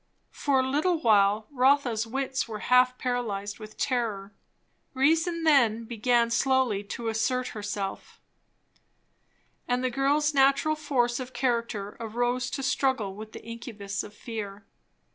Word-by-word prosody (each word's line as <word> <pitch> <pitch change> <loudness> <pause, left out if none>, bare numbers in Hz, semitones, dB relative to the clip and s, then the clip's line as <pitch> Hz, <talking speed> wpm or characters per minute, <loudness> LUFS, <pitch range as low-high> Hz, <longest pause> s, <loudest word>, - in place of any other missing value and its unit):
For 275 -2 +1
a 260 - -2
little 310 +6 +1
while 210 -3 +3
Rotha's 255 -4 +2
wits 265 +2 -2
were 220 -2 -5 0.2
half 250 0 +5
paralyzed 215 -5 -3
with 215 0 -11
terror. 215 -6 -2 0.6
Reason 325 +5 +2
then 240 -8 +4
began 235 +1 +1
slowly 255 -5 +2
to 230 +3 -5
assert 250 +3 0
herself, 205 -2 -5 1.5
and 250 +1 0
the 255 - 0
girl's 290 +3 +1
natural 275 +3 +3
force 260 -5 0
of 255 0 -7
character 235 -5 -2
arose 240 +2 -1
to 270 - -4
struggle 255 -6 0
with 215 +2 -10
the - - -9
incubus 225 -4 -5
of 210 - -10
fear. 210 -3 -7
245 Hz, 130 wpm, -27 LUFS, 215-270 Hz, 1.5 s, half